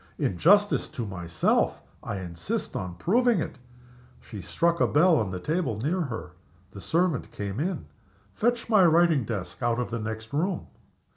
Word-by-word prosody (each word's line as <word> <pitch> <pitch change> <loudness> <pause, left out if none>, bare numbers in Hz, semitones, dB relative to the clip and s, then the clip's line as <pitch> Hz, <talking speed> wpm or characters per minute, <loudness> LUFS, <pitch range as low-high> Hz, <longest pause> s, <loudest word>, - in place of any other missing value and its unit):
"In 95 - 0
justice 205 +4 +4
to 120 - -5
myself, 85 -5 0 0.2
I 100 - -4
insist 85 -2 -4
on 90 -2 -4
proving 235 - +2
it!" - - -5 0.6
She 105 -4 -9
struck 170 - 0
a - - +5
bell 165 +3 +4
on 105 -4 -2
a 90 - -4
table 155 - -1
near 155 - -1
her. 110 - -5 0.4
The 100 - -10
servant 165 - 0
came 100 +2 -4
in. 185 +5 -2 0.5
"Fetch 240 +2 0
my 215 -4 +5
writing 165 -5 +4
desk 95 -5 -5
out 120 0 +1
of 125 -1 -3
the 115 - -2
next 110 +2 -6
room." 175 +5 -1
130 Hz, 165 wpm, -27 LUFS, -, 0.6 s, a